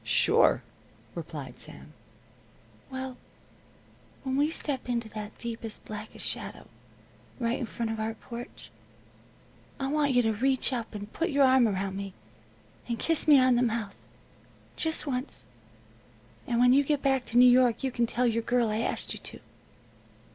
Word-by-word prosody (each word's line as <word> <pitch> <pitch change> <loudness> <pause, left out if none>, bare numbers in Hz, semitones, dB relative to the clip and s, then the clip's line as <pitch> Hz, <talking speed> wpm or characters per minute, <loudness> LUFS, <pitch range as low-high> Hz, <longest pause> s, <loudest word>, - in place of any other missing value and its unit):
"Sure," - - +4 0.5
replied - - -7
Sam. - - -9 1.0
"Well, 260 -1 -5 1.1
when 265 -1 -1
we 290 +2 +3
step 280 -5 -4
into 235 -2 -1
that 210 0 -7
deepest, 230 -2 -6
blackest 215 0 -7
shadow, - - -4 0.7
right 235 0 0
in 245 - -3
front 230 -1 -3
of 225 - -4
our 220 +1 -2
porch, 235 +2 -9 1.1
I 270 0 -1
want 290 -2 +2
you 245 0 +4
to 225 -1 +2
reach 260 +4 +2
up, 230 -3 -4
and 205 +1 -7
put 335 +2 -1
your 280 -2 +3
arm 260 -2 +5
around 195 -1 -2
me 195 -1 -6 0.7
and 235 -1 -2
kiss 325 +4 0
me 295 -2 +8
on 255 -1 +5
the - - +3
mouth, 225 -4 -1 0.8
just 320 -1 -1
once. 260 -1 -4 1.0
And 235 -1 +1
when 250 +1 +6
you 280 +2 +5
get 290 0 0
back 265 -2 +2
to 235 - -1
New 250 +1 +9
York 250 -1 +4
you 265 - 0
can 240 -1 +1
tell 245 +2 0
your 230 -1 +2
girl 240 0 +1
I 215 +1 -1
asked 230 - -2
you - - -7
to." - - -10
245 Hz, 160 wpm, -28 LUFS, 225-265 Hz, 1.1 s, New